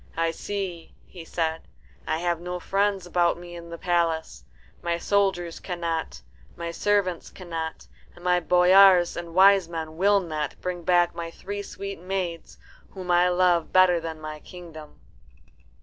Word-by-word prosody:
"I 165 0 +1
see," 185 -2 -5
he 175 -3 -11
said, 160 -1 -3 0.4
"I 155 - 0
have 170 0 -1
no 180 0 -4
friends 195 0 0
about 175 -1 +1
me 175 0 -10
in 170 0 -10
the 170 - -7
palace. 170 -2 -1 0.4
My 170 0 -1
soldiers 185 -3 0
cannot, 170 -3 -4 0.3
my 170 0 -5
servants 190 -1 0
cannot, 165 -3 -6 0.3
and 175 - -15
my 180 0 +3
boyars 180 +1 +6
and 170 -1 -7
wise 190 -2 +6
men 160 -1 -6
will 200 +2 +4
not, 155 -5 -4
bring 180 -1 -4
back 175 0 +3
my 170 0 -5
three 200 +4 -6
sweet 200 -1 -7
maids, 180 -3 -4 0.3
whom 185 -2 -5
I 175 +1 +4
love 180 -2 +2
better 185 -2 +5
than 160 -1 -6
my 155 0 -7
kingdom." 160 -3 -12
175 Hz, 150 wpm, -25 LUFS, 165-185 Hz, 0.4 s, boyars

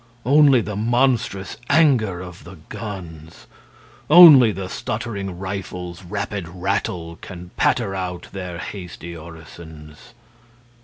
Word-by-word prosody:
Only 140 -1 +5
the 105 -1 -6
monstrous 115 -3 0
anger 130 - +3
of 90 -1 -11
the 90 +1 -12
guns. 90 -7 -9 0.6
Only 150 -8 +9
the 95 -2 -6
stuttering 100 -3 -5
rifles' 90 -2 -6
rapid 100 +1 -5
rattle 90 -2 -3
Can 90 -1 -10
patter 115 -6 +1
out 90 -2 -5
their 90 -3 -6
hasty 85 -2 -8
orisons. 80 +4 -13
95 Hz, 105 wpm, -21 LUFS, 85-110 Hz, 0.6 s, Only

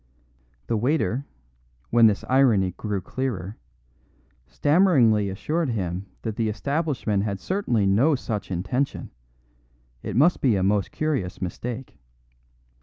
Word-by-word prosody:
The - - -1
waiter, 135 +2 0 0.6
when 115 -1 +6
this 105 -2 0
irony 120 -8 +3
grew 100 +1 -4
clearer, 110 -5 -4 0.9
stammeringly 130 - +3
assured 150 - -2
him 95 -4 -3 0.2
that 110 -2 -4
the 110 -1 0
establishment 140 -4 -1
had 100 -2 -2
certainly 125 - 0
no 120 +11 +3
such 105 -7 -4
intention; 95 +10 -2 0.9
it - - -5
must 155 +9 +4
be 125 -6 +3
a 95 - 0
most 100 0 +1
curious 140 -13 -2
mistake. 120 +7 -6
115 Hz, 115 wpm, -24 LUFS, 100-140 Hz, 0.9 s, when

